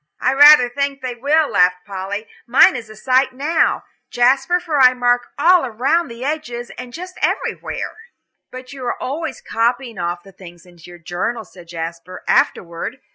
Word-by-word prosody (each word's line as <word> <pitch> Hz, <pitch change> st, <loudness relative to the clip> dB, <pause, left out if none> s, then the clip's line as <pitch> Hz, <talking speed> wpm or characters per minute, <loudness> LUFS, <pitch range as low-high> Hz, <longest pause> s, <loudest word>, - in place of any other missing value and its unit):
"I 260 Hz, -, +1 dB
rather 290 Hz, -2 st, +8 dB
think 280 Hz, +2 st, -3 dB
they 255 Hz, -1 st, -3 dB
will," 290 Hz, +6 st, +1 dB
laughed 180 Hz, 0 st, +2 dB
Polly. 200 Hz, +2 st, -5 dB, 0.2 s
"Mine 250 Hz, +2 st, +6 dB
is 230 Hz, -3 st, -7 dB
a 215 Hz, -, -12 dB
sight 260 Hz, +4 st, +1 dB
now, 305 Hz, +5 st, 0 dB, 0.3 s
Jasper, 270 Hz, +8 st, +2 dB
for 325 Hz, -5 st, -2 dB
I 255 Hz, 0 st, +6 dB
mark 245 Hz, 0 st, +1 dB
all 330 Hz, -2 st, +4 dB
round 270 Hz, +9 st, 0 dB
the 235 Hz, +2 st, -7 dB
edges 260 Hz, -6 st, -4 dB
and 250 Hz, -1 st, -9 dB
just 365 Hz, +6 st, -9 dB
everywhere." -, -, -3 dB, 0.5 s
"But 255 Hz, +1 st, -10 dB
you 270 Hz, -2 st, -9 dB
are -, -, -3 dB
always 295 Hz, +2 st, -5 dB
copying 235 Hz, -1 st, -1 dB
off 175 Hz, 0 st, -3 dB
the 195 Hz, -, -15 dB
things 175 Hz, -2 st, -14 dB
into 175 Hz, -1 st, -16 dB
your 175 Hz, -, -12 dB
journal," 180 Hz, +7 st, -4 dB
said 175 Hz, -2 st, -16 dB
Jasper, 170 Hz, +1 st, -7 dB
"afterward. 170 Hz, +8 st, 0 dB
245 Hz, 170 wpm, -19 LUFS, 190-275 Hz, 0.5 s, rather